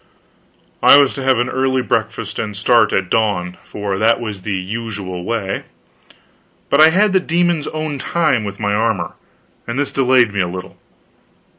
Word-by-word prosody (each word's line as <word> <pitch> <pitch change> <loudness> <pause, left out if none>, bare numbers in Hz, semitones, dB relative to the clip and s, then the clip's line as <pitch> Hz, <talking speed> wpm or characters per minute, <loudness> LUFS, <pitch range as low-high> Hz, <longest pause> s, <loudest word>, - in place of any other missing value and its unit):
I - - +8
was 140 -2 +4
to 135 - -6
have 130 -2 +3
an 120 +1 0
early 130 -1 0
breakfast, - - -2
and 105 -2 -4
start 120 +4 +3
at 95 -1 -1
dawn, 100 -5 0
for 100 -2 -4
that 115 +1 +3
was 105 -5 -5
the 100 +2 -3
usual 95 -2 -5
way; 100 -2 -3 1.1
but 140 - +5
I 155 - +8
had 195 +4 +2
the 190 - +4
demon's 175 -3 0
own 155 -2 -4
time 155 -7 0
with 100 -1 -6
my 105 -1 -1
armor, 110 -1 -1 0.5
and 120 +2 -4
this 145 0 0
delayed 125 -4 +3
me 100 - -2
a 90 - +1
little. 90 +2 -7
115 Hz, 170 wpm, -18 LUFS, 100-135 Hz, 1.1 s, I